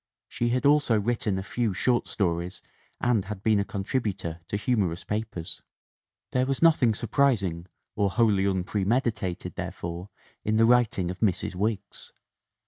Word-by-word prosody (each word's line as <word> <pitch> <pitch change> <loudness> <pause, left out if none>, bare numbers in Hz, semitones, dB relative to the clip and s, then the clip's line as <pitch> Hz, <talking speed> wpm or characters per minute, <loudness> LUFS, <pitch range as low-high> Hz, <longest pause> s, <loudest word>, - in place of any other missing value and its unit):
She 120 - -1
had 125 +3 0
also 140 -6 +4
written 110 -2 0
a 95 - -3
few 110 -1 -1
short 120 +3 +1
stories 90 -1 -2 0.4
and 115 -5 +1
had 100 -1 -7
been 110 -2 +3
a - - +2
contributor 100 -5 -3
to 100 - -2
humorous 100 -7 0
papers. 105 -6 -4 0.7
There 130 0 +1
was 135 -1 0
nothing 140 -9 +4
surprising 105 -8 +1 0.3
or 100 -1 +2
wholly 105 -2 +2
unpre 95 +1 0
meditated 110 -4 -1
therefore 85 +3 -6 0.3
in 110 +1 +1
the 115 - +5
writing 115 -7 +3
of 90 - -9
Mrs. 100 -5 0
Wiggs. 100 +1 -3
105 Hz, 145 wpm, -27 LUFS, 95-120 Hz, 0.7 s, the